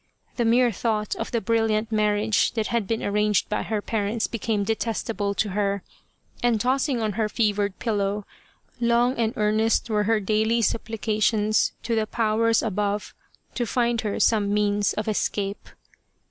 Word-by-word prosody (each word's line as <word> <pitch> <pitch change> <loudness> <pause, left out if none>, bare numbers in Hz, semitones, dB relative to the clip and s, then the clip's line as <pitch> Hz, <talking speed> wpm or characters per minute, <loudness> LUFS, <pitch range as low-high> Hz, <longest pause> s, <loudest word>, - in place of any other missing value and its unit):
The 240 - 0
mere 240 +1 +4
thought 215 -1 -1
of - - -4
the 235 - 0
brilliant 225 -1 +1
marriage 210 0 +2
that 220 -2 -1
had 235 -4 0
been 225 +1 -2
arranged 210 0 +1
by 210 - -1
her 215 -2 -3
parents 215 0 -1
became 220 -2 -1
detestable 215 -1 -2
to 210 - 0
her, 200 0 -1 0.6
and 240 -2 +2
tossing 260 +2 +1
on 215 - 0
her 215 +1 -1
fevered 205 -3 0
pillow, 205 -2 -1 0.5
long 240 +2 +2
and 225 -1 +1
earnest 220 +2 +1
were 210 -1 +1
he^ 215 -2 +1
daily 220 +3 +2
sup 220 - 0
plications 215 -1 +1
to 235 - -2
the 220 -1 0
powers 225 0 +1
above 205 -1 -2 0.4
to 240 -2 -2
find 240 -2 +1
her 210 -2 -2
some 210 -3 +2
means 205 -1 +1
of 215 - -3
escape. 205 -1 -2
215 Hz, 160 wpm, -24 LUFS, 210-230 Hz, 0.6 s, mere